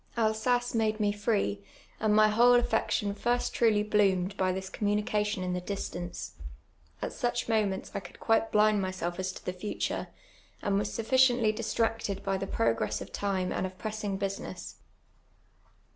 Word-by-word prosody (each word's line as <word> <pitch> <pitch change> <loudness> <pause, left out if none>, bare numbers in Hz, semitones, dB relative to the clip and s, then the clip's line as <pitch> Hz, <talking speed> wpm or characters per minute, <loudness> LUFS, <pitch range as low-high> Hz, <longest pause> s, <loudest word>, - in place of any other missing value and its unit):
Alsace 235 +2 +1
made 220 -1 +1
me 205 -1 +2
free, 205 - 0 0.4
and 210 -1 +2
mv 215 0 +6
whole 245 +3 +6
atfection 220 -3 0
first 240 +3 0
trulv 215 -3 +3
bloomed 195 -2 +3
by 185 -1 +1
this 190 +1 -4
communication 210 0 0
in 180 0 -1
the 180 - -2
distance. 180 -2 -5 0.7
At - - -3
such 240 0 -1
moments 210 -4 0
I - - -2
could - - -13
quite 225 0 +2
blind 210 -1 +4
myself 185 -2 -3
as 185 0 -1
to - - -11
the 180 - -2
future; 185 +3 -3 0.6
and 200 -1 +2
was 205 0 -2
sufficiently 245 -1 +3
dis 220 +1 -4
tracted 225 -3 0
by 195 -1 0
tlie 195 - -4
process 115 -2 +1
of - - -8
time 190 -2 -1
and - - -1
of 185 0 -5
pressing; 215 -2 -3
business. 195 0 -5
210 Hz, 160 wpm, -29 LUFS, 190-225 Hz, 0.7 s, mv